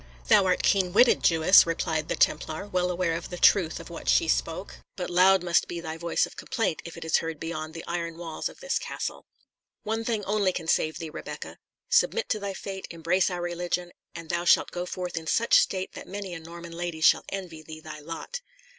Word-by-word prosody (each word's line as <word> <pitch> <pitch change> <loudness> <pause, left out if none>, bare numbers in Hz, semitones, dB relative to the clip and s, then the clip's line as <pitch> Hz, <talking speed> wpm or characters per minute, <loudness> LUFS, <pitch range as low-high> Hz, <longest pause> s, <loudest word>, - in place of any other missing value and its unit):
"Thou - - +6
art 180 - +1
keen 185 -3 +2
witted, 240 +4 +5
Jewess," 165 +2 +6
replied 160 -2 -1
the - - -1
Templar, 160 +6 0
well 180 -2 0
aware 175 -2 0
of 165 +1 -5
the 180 - -6
truth 175 -3 +4
of - - -10
what - - -5
she - - +4
spoke; - - -1 0.2
"but 180 -1 -4
loud 185 +1 +5
must 175 -1 +2
be 170 - -5
thy 160 -1 -5
voice 170 +1 0
of - - -13
complaint, 225 -10 -2
if 170 - -8
it 165 - -7
is 160 - +3
heard 165 -2 -4
beyond 160 -1 -5
the 165 - -7
iron 170 -1 -4
walls 165 -2 -4
of - - -16
this - - 0
castle. - - -5 0.6
One 225 +1 -2
thing 225 -3 -2
only 200 -2 +1
can 165 -2 -5
save 155 0 +1
thee, 165 -3 -6
Rebecca. - - -8 0.3
Submit 465 - +2
to 215 - 0
thy 200 -1 -4
fate, 190 -1 -6
embrace 170 +3 +1
our 175 -1 -4
religion, 175 0 -2 0.2
and 165 -1 -8
thou 175 +1 -1
shalt 175 - +4
go 180 0 -4
forth 180 -1 -5
in 160 -1 -4
such 230 +7 +4
state 190 -1 -1
that - - -9
many 195 -1 -6
a 170 - -6
Norman 170 +1 -10
lady 170 -2 -4
shall - - +5
envy 180 -5 -6
thee 155 0 -10
thy 155 -1 -9
lot." 165 - -6
175 Hz, 215 wpm, -27 LUFS, 165-190 Hz, 0.6 s, Thou